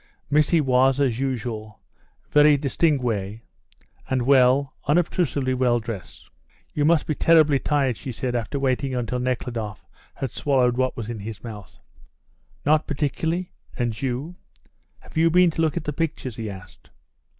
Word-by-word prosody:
Missy 150 +3 +4
was, 130 0 +3
as 130 -4 +1
usual, 115 -5 -4 0.5
very 150 0 +6
distinguee, 125 - 0 0.7
and 130 -2 +1
well, 135 +1 +4
unobtrusively 150 -4 +1
well, 125 -2 +2
dressed. 110 -6 -7 0.5
"You 145 - +1
must 160 -1 +3
be 155 - -1
terribly 155 -3 +4
tired," 135 -6 0
she 130 - -6
said, 125 +1 -3
after 120 +4 -2
waiting 135 0 0
until 125 0 -2
Nekhludoff 120 -4 -3 0.3
had 135 -4 -4
swallowed 125 -3 +1
what 130 +1 -1
was 115 -3 -5
in 115 -2 -5
his 105 0 -8
mouth. 105 -4 -9 0.9
"Not 155 +1 +3
particularly. 160 +4 -2 0.3
And 120 -3 -2
you? 135 +7 -3 0.6
Have - - -12
you 165 +1 +4
been 180 0 +4
to 160 - -2
look 160 0 +1
at 170 - -2
the 150 - -3
pictures?" 140 -6 -3
he 110 -2 -4
asked. 95 -3 -12
130 Hz, 150 wpm, -23 LUFS, 120-150 Hz, 0.9 s, very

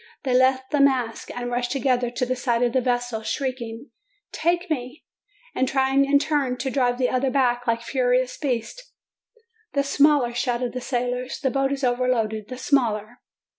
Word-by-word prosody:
They 260 -3 0
left 260 +1 +3
the 290 - +2
mast, 255 -5 +1
and 245 0 -5
rushed 245 0 -1
together 250 -2 +1
to 245 +1 -2
the 255 +1 -1
side 245 -1 0
of 240 - +1
the 260 - +2
vessel, 245 -2 -1
shriek 260 +3 -3
ing: 230 +3 -8 0.4
"Take 345 +3 0
me!" 260 -3 -4 0.5
and 260 - 0
trying 270 +1 +2
in 280 +1 +4
turn, 280 -3 0
to 265 +1 -3
drive 245 -2 +1
the 255 -1 +2
other 260 +1 +1
back, 245 -2 +1
like 230 0 0
furious 250 0 +1
beasts. 275 - -4 0.8
"The 280 - +2
smaller!" 280 -3 +3
shouted 240 0 -1
the 255 - -4
sailors. 250 0 -2
"The 265 -4 0
boat 270 0 0
is 280 0 -3
overloaded! 245 -4 0
The 255 - -7
smaller!" 240 -4 0
255 Hz, 175 wpm, -24 LUFS, 245-270 Hz, 0.8 s, in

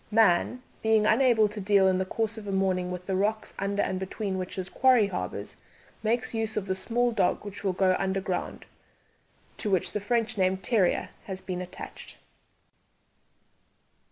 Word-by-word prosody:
Man, 225 +3 +3 0.2
being 220 -1 +3
unable 225 -1 +4
to 210 +1 -6
deal 195 -1 +4
in 185 0 +2
the 190 - -1
course 225 +2 -1
of 215 -2 -9
a - - -2
morning 190 -2 0
with 180 0 -6
the 190 - -1
rocks 215 +3 -1
under 200 +1 0
and 185 - -2
between 190 0 -3
which 185 0 -5
his 185 -2 -4
quarry 255 +1 +4
harbours, 190 -2 -4 0.4
makes 230 +3 0
use 220 -1 -2
of 205 - -1
the 190 - -1
small 240 +6 0
dog 210 -2 0
which 205 0 -7
will 190 -2 +1
go 185 0 +3
underground, 190 -1 -2 0.9
to 210 - +1
which 190 -3 +2
the 210 - -3
French 230 0 0
name 185 0 +2
terrier 190 -2 +1 0.2
has 190 -2 -4
been 180 -1 -5
attached. 180 0 -9
200 Hz, 170 wpm, -27 LUFS, 190-220 Hz, 0.9 s, unable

